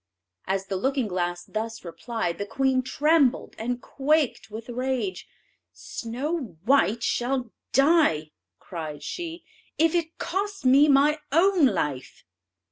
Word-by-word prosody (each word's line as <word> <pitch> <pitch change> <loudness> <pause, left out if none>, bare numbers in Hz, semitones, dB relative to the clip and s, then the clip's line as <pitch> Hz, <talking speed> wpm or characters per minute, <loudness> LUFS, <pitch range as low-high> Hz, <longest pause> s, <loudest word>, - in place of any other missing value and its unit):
As 195 0 -1
the 195 -1 -3
looking 265 +3 0
glass 175 -2 -2
thus 225 -1 -5
replied, 175 +1 -4
the 200 - -2
queen 260 +3 +1
trembled 285 +1 +2
and 245 +2 -2
quaked 290 -2 0
with 220 +2 -8
rage. 245 -6 -2 0.5
"Snow 250 - -5
white 235 -3 +3
shall 245 -1 -1 0.2
die," 275 - +3 0.3
cried 155 -4 -7
she, 335 - -5 0.3
"if 325 0 +3
it 330 -2 -1
costs 395 -1 -3
me 275 +4 +6
my 295 +2 +4
own 345 -1 +5
life!" 150 - -3
255 Hz, 125 wpm, -26 LUFS, 200-300 Hz, 0.5 s, me